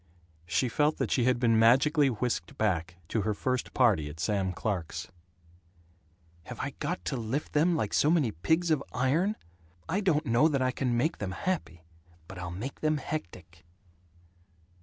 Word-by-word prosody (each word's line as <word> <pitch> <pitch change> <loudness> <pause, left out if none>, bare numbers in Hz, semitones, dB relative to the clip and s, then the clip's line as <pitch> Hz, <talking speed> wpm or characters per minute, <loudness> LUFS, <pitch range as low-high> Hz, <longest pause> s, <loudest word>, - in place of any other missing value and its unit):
She 105 +9 +1
felt 150 +5 +1
that - - -2
she 120 - +2
had 125 -1 +2
been 115 -2 +3
magically 135 +6 +5
whisked 125 +3 -3
back 85 -6 0
to 110 - 0
her 105 +1 -1
first 130 +3 -2
party, 100 - +3
at 75 +2 -10
Sam 95 +2 0
Clark's. 90 -3 -3 1.4
"Have - - -8
I - - -3
got 85 - -3
to 135 - -1
lift 125 +5 -3
them, 165 +4 +3
like 110 -9 -2
so 150 - +3
many 155 -9 +3
pigs 160 - 0
of 150 -3 +2
iron? 160 +12 +1 0.5
I 185 - 0
don't 165 -6 +1
know 120 +5 +4
that 140 -4 0
I 130 - +1
can 125 -3 -1
make 155 +7 0
them 95 -2 -3
happy, 95 - -3 0.4
but 95 - -9
I'll 90 -1 -5
make 105 +11 -6
them 155 0 +1
hectic." 85 - -7
125 Hz, 170 wpm, -29 LUFS, 95-150 Hz, 1.4 s, magically